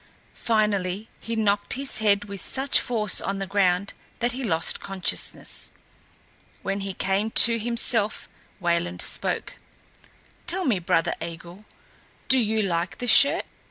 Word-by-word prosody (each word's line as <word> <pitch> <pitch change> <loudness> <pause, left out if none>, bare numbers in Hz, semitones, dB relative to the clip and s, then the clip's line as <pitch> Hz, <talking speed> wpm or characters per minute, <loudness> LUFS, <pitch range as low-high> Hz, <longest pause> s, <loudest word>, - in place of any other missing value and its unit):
Finally 210 -2 -1
he 230 - -6
knocked 205 -2 0
his 275 +1 -1
head 205 -1 +1
with 200 -1 -8
such 270 +1 +1
force 215 -5 +2
on 195 0 -3
the 195 - -4
ground 195 0 0 0.2
that 240 0 -1
he 260 +2 -6
lost 165 -8 +3
consciousness. 195 -2 -3 0.9
When 195 +1 -3
he 195 -1 -6
came 195 +3 -1 0.2
to 230 0 0
himself 230 -1 0 0.3
Wayland 175 0 -1
spoke: - - -2 0.9
"Tell 365 +1 -1
me, 220 -8 +1
brother 165 -1 0
Eigil, 170 +4 -9 0.6
do 265 - +7
you 220 -2 0
like 175 -1 -3
the 245 - -5
shirt?" 280 +7 +5
205 Hz, 135 wpm, -24 LUFS, 190-230 Hz, 0.9 s, do